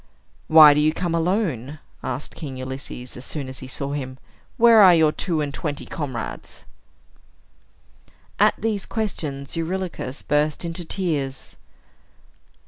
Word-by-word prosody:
"Why 155 -2 +9
do 145 - +1
you 155 +1 +3
come 175 -1 -2
alone?" 165 - -1 0.2
asked 130 +3 -4
King 140 -5 -7
Ulysses, 130 -1 -7
as 125 - -9
soon 140 -1 -4
as 130 0 -8
he 130 - -9
saw 140 +2 -4
him. 130 -3 -5 0.4
"Where 230 -2 +7
are 185 -3 +8
your 160 -2 +4
two 165 -1 -2
and 145 -1 -3
twenty 145 -2 -4
comrades?" 135 -7 -6 1.7
At - - +5
these 215 -3 -2
questions, 150 -11 -4
Eurylochus 165 -5 -4
burst 150 +3 0
into 170 +1 -4
tears. 150 -8 -3
150 Hz, 135 wpm, -23 LUFS, 135-175 Hz, 1.7 s, Why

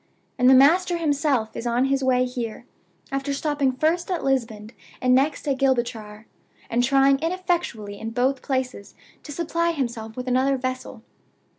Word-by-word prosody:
And 250 +1 +5
the 265 - +8
master 345 +7 +4
himself 285 -8 0
is 240 - -4
on 240 +2 +2
his 270 0 0
way 255 -1 +3
here, 245 -2 -5 0.5
after 275 +1 -2
stopping 290 -2 0
first 320 +7 0
at 360 -3 -2
Lisbon, 230 -5 -1 0.3
and 255 0 +2
next 280 +4 +1
at 270 -2 0
Gibraltar, 230 -5 -1 0.5
and 240 +1 +2
trying 270 +1 +4
ineffectually 330 - -2
in 225 - -5
both 255 +3 0
places 255 -7 -3 0.3
to 295 - -10
supply 335 +2 -1
himself 235 -6 -4
with 250 0 -5
another 260 +2 +2
vessel. 255 0 -5
260 Hz, 155 wpm, -23 LUFS, 240-290 Hz, 0.5 s, the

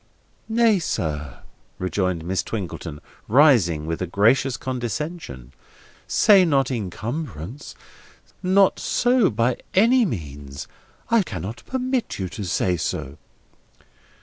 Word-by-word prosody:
"Nay, 225 -3 +4
sir," 75 - -3 0.4
rejoined 90 -3 -1
Miss 90 0 0
Twinkleton, 90 -8 -6 0.3
rising 110 - +4
with 80 +2 -3
a 90 - -1
gracious 120 +8 +2
condescension: 125 - -5 0.5
"say 200 -4 +6
not 135 -6 +2
incumbrance. 115 - -5 0.7
Not 190 +1 +3
so, 245 -4 +2
by 115 +3 0 0.2
any 235 +6 +5
means. 70 - -6 0.4
I 230 -1 +5
cannot 100 - -6
permit 255 -1 -2
you 95 -2 -3
to 105 - -6
say 90 0 0
so." 70 -2 -4
115 Hz, 105 wpm, -23 LUFS, -, 0.7 s, say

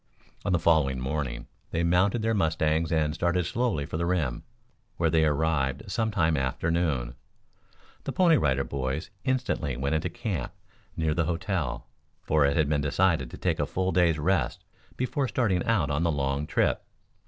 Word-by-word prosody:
On 100 - -1
the 90 - +4
following 75 -6 +2
morning 65 -1 -3 0.2
they 85 - -1
mounted 95 +6 +2
their 115 0 +2
mustangs 80 -4 +1
and 75 -2 +1
started 85 +2 0
slowly 115 - -1
for 80 - -4
the 85 - -1
rim, 80 -9 0 0.6
where 85 -2 +2
they 80 0 +4
arrived 75 - 0
some 110 +3 0
time 80 -6 +2
after 65 +4 -1
noon. 70 -9 0 0.9
The - - -2
Pony 175 -3 +4
Rider 70 - +2
Boys 70 +7 -3
instantly 120 - -1
went 70 +3 -1
into 80 +3 0
camp 85 - -4 0.4
near 80 -1 +1
the 85 0 0
hotel, 85 0 -2 0.4
for 75 -2 +3
it 70 - 0
had 80 -3 +3
been 75 -1 +1
decided 75 -2 +1
to - - -9
take - - -1
a - - 0
full 95 0 -1
day's 85 -2 +3
rest 75 -5 0 0.3
before 130 +2 -1
starting 105 -9 +1
out 90 -11 +1
on 75 +2 0
the 85 -1 +2
long 70 0 -1
trip. - - +1
80 Hz, 175 wpm, -27 LUFS, 70-90 Hz, 0.9 s, the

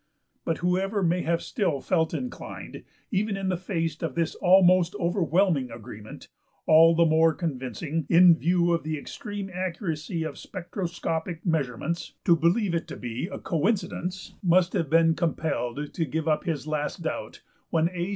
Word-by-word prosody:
But 165 - 0
whoever 195 +3 +1
may 175 +1 +2
have 170 0 0
still 180 - -1
felt 160 +3 +1
inclined, 250 -1 -6 0.3
even 205 0 0
in 195 -1 -2
the 185 - +1
face 165 -4 -3
of 160 -6 -3
this 165 -1 0
almost 185 0 +4
overwhelming 175 -6 +1
agreement 110 -2 -10 0.4
all 165 +1 +7
the 170 +1 +4
more 160 0 +4
convincing, 145 - -3
in 175 0 +7
view 175 +1 +2
of 170 - +1
the 155 0 -3
extreme 200 +6 -6
accuracy 170 -2 -3
of 155 -3 -6
spectroscopic 170 -2 -4
measurements 160 0 -2
to 170 - +6
believe 170 +4 +2
it 170 - -1
to - - -7
be 120 +6 -4
a - - -5
coincidence, 185 +1 -2
must 180 0 +3
have 160 - 0
been 165 +1 +5
compelled 150 -5 -2
to 165 - -1
give 155 +3 -3
up 155 -1 +1
his 155 -5 -2
last 150 -1 -3
doubt - - -5 0.3
when 165 0 +2
A. 180 0 -3
170 Hz, 160 wpm, -26 LUFS, 155-180 Hz, 0.4 s, all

